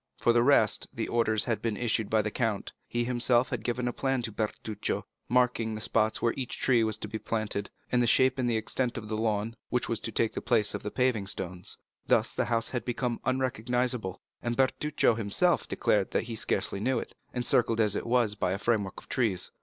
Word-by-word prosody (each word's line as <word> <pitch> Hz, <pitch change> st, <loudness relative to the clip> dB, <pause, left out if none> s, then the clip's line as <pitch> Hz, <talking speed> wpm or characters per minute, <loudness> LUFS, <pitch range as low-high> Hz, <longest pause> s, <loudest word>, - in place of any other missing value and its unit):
For 120 Hz, -, +3 dB
the 120 Hz, -, +4 dB
rest, 120 Hz, -5 st, +3 dB
the 115 Hz, -, -3 dB
orders 110 Hz, -2 st, +2 dB
had 110 Hz, -4 st, -1 dB
been 110 Hz, -3 st, -1 dB
issued 110 Hz, -2 st, 0 dB
by 110 Hz, -1 st, +3 dB
the 105 Hz, -, -2 dB
count; 110 Hz, -4 st, -1 dB, 0.2 s
he 120 Hz, 0 st, -1 dB
himself 120 Hz, 0 st, +2 dB
had -, -, -3 dB
given 120 Hz, 0 st, -1 dB
a 120 Hz, -, -1 dB
plan 135 Hz, -2 st, 0 dB
to 115 Hz, -, -2 dB
Bertuccio, 110 Hz, 0 st, -3 dB, 0.3 s
marking 120 Hz, -3 st, +2 dB
the -, -, -5 dB
spot 110 Hz, 0 st, +1 dB
where 115 Hz, -, +3 dB
each 130 Hz, -2 st, -4 dB
tree 120 Hz, -4 st, +3 dB
was 110 Hz, -1 st, 0 dB
to 110 Hz, -, -5 dB
be 110 Hz, +1 st, -5 dB
planted, 110 Hz, -3 st, -2 dB, 0.2 s
and 125 Hz, -, +3 dB
the 120 Hz, -, +3 dB
shape 130 Hz, +3 st, +4 dB
and 125 Hz, -1 st, +1 dB
extent 120 Hz, +2 st, 0 dB
of 110 Hz, -2 st, -6 dB
the 110 Hz, -, -1 dB
lawn 110 Hz, 0 st, -1 dB
which 125 Hz, -, 0 dB
was 115 Hz, -2 st, 0 dB
to 115 Hz, -, -3 dB
take 110 Hz, +1 st, +1 dB
the -, -, -4 dB
place 110 Hz, -4 st, +2 dB
of -, -, -4 dB
the 105 Hz, -, -4 dB
paving 120 Hz, -5 st, +1 dB
stones. 90 Hz, -2 st, -4 dB, 0.3 s
Thus -, -, +3 dB
the -, -, 0 dB
house 115 Hz, -1 st, 0 dB
had 125 Hz, -, -3 dB
become 120 Hz, -1 st, -2 dB
unrecognizable, 125 Hz, -4 st, 0 dB, 0.2 s
and 120 Hz, 0 st, -2 dB
Bertuccio 135 Hz, 0 st, +2 dB
himself 115 Hz, -, +1 dB
declared 100 Hz, -2 st, +1 dB
that -, -, 0 dB
he 115 Hz, 0 st, -6 dB
scarcely 100 Hz, -, -1 dB
knew 130 Hz, +5 st, +1 dB
it, -, -, -5 dB, 0.2 s
encircled 120 Hz, -2 st, +2 dB
as 105 Hz, -2 st, +3 dB
it -, -, -3 dB
was 120 Hz, -3 st, +3 dB
by 95 Hz, -3 st, -1 dB
a -, -, -1 dB
framework 105 Hz, -3 st, 0 dB
of -, -, -17 dB
trees. 110 Hz, -8 st, 0 dB
115 Hz, 215 wpm, -29 LUFS, 110-125 Hz, 0.3 s, the